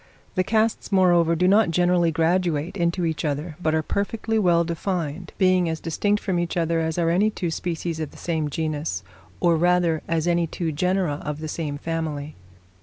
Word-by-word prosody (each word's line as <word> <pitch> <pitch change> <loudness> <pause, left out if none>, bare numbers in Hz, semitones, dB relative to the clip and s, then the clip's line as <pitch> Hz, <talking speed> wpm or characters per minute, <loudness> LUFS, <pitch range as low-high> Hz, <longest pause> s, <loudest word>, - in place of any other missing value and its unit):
The 185 - +1
castes, 220 +3 0
moreover, 175 -3 +4
do 180 +3 +2
not 205 +1 +5
generally 175 0 +3
graduate 165 0 0
into 170 -1 0
each 160 0 -2
other, 150 +2 -2
but 160 -2 +1
are 160 - +1
perfectly 220 +5 -1
well 170 -4 +3
defined; 170 -1 -3
being 185 -2 +3
as 160 0 -3
distinct 205 +6 0
from 185 -3 0
each 175 0 -2
other 165 0 +1
as 160 0 -1
are 165 -1 +2
any 200 +5 +3
two 180 -5 -3
species 165 -1 -3
of 155 -2 -3
the - - -16
same 160 -3 -2
genus, 150 - -3 0.4
or 170 -1 +3
rather 175 -1 +2
as 165 0 0
any 170 -1 +2
two 165 0 -3
genera 180 -1 0
of 150 -1 -3
the 155 0 -6
same 150 -2 -3
family. 155 -2 -4
170 Hz, 185 wpm, -24 LUFS, 160-180 Hz, 0.4 s, not